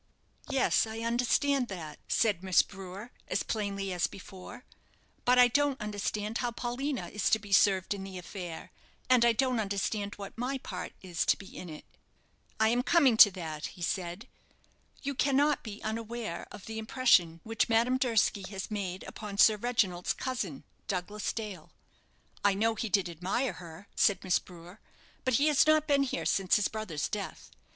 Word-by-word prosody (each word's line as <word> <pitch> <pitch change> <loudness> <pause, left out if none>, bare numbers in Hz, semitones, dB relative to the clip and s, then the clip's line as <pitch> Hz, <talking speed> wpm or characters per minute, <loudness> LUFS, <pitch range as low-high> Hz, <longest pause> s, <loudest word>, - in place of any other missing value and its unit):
"Yes, 270 -4 +2
I 220 +1 -6
understand 250 +3 +1
that," 160 -7 -7
said 210 -6 +2
Miss 190 -1 +5
Brewer, 195 +4 -9 0.2
as - - 0
plainly 200 -3 -2
as 175 -1 +1
before; 190 +4 -11 0.6
"but 250 +1 +5
I 250 0 +8
don't 285 +2 +1
understand 210 +1 -3
how 245 - 0
Paulina 245 +3 -3
is 210 -2 0
to 220 - +4
be 205 -2 -12
served 195 -1 +4
in 195 -1 -6
the 190 -1 -7
affair, 180 -2 -7 0.4
and 250 -2 +6
I 235 - +6
don't 255 +1 +1
understand 200 0 -2
what 200 -1 -8
my 250 +4 -2
part 180 -8 -6
is 175 -2 -1
to - - +4
be 195 - -12
in 180 - -7
it." 155 - -10 0.7
"I 220 0 +4
am 240 +2 +2
coming 275 -4 +4
to 210 - +10
that," 160 -4 -5
he 175 - -6
said. 180 +6 -3 0.8
"You 280 0 -2
cannot 280 +2 +2
be 215 -2 -8
unaware 225 -4 -4
of 205 - -10
the 220 -1 -5
impression 220 -8 +3
which 225 +1 0
Madame 235 +3 +3
Durski 225 -5 +2
has 195 +1 -6
made 190 -3 -3
upon 205 -2 -7
Sir 215 +1 +7
Reginald's 205 -6 0
cousin, 210 - -4 0.2
Douglas 200 +3 -2
Dale." 205 -8 -6 0.7
"I 205 -1 +4
know 225 +3 +2
he 220 0 -3
did 195 -3 +2
admire 185 - -2
her," 170 +2 -11
said 200 -3 +3
Miss 185 -1 +2
Brewer, 180 +3 -13 0.4
"but 255 -3 +2
he 280 - +3
has 300 -1 +4
not 310 0 +4
been 285 -2 +3
here 275 - -2
since 195 -1 +2
his 210 - +2
brother's 215 -9 -3
death. 205 -2 -6
210 Hz, 175 wpm, -30 LUFS, 190-245 Hz, 0.8 s, to